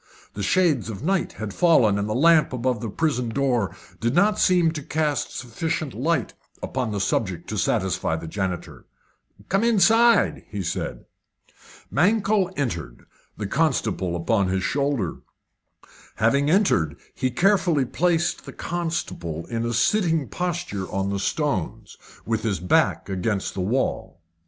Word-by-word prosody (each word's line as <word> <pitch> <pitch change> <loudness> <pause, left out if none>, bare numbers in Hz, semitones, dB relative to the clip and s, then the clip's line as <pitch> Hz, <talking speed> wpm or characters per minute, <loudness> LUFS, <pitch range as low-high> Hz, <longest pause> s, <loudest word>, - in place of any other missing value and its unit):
The 105 - -5
shades 145 - +2
of 110 +2 -6
night 190 +3 0
had 110 -3 -6
fallen, 125 - +4
and 100 +1 -2
the 110 - -1
lamp 155 +1 +4
above 125 -2 -1
the 115 - -3
prison 125 -2 -1
door 120 -4 0 0.2
did 120 +4 0
not 205 +4 +3
seem 175 -3 +4
to 155 -2 -5
cast 150 -2 -1
sufficient 145 +4 -3
light 135 +2 -1 0.3
upon 125 -4 -2
the 100 - -2
subject 95 -3 -1
to 110 - -3
satisfy 95 -6 0
the 80 +1 -6
janitor. 95 0 -4 0.6
"Come 195 +4 +1
inside," 230 +1 +4
he 100 -2 -4
said. - - -4 0.9
Mankell 200 +3 +2
entered, 85 - -4 0.3
the 105 - -4
constable 110 - 0
upon 100 +3 +1
his 95 0 -1
shoulder. 140 - -1 1.0
Having 140 +6 +2
entered, 155 - +2 0.2
he 130 - -1
carefully 170 - +2
placed 170 +5 0
the - - -8
constable 160 - -4
in 115 0 -1
a - - -1
sitting 160 - +2
posture 175 - -3
on 95 0 -1
the 100 - -2
stones, 140 - -2 0.3
with 115 -1 -1
his 105 -6 -1
back 90 +1 +2
against 95 +1 -2
the 95 - -3
wall. 105 -3 -1
125 Hz, 140 wpm, -24 LUFS, 100-165 Hz, 1.0 s, fallen